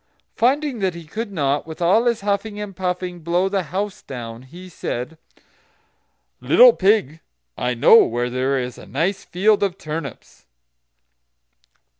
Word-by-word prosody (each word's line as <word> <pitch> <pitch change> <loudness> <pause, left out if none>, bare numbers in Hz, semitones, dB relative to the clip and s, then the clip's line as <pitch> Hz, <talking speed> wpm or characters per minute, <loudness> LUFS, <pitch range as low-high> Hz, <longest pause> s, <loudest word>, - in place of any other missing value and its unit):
Finding 265 +1 +1
that 190 -3 -1
he 170 - -9
could 215 +7 -5
not, 145 -4 -1
with 160 - -9
all 185 +7 +3
his 235 -3 +1
huffing 205 +1 -2
and 205 -2 -6
puffing, 180 -1 -3
blow 175 +3 0
the 195 0 0
house 200 +1 -3
down, 115 -3 -8
he 170 +8 -12
said: 155 -4 -5 1.2
"Little - - +7
pig, 190 -7 +1 0.4
I 125 0 -2
know 120 - +7
where 120 +1 -2
there 130 +2 0
is 125 -1 -4
a - - -13
nice 175 +8 -1
field 205 +3 +2
of 195 -2 -1
turnips." 150 - -8
180 Hz, 145 wpm, -21 LUFS, 140-205 Hz, 1.2 s, Little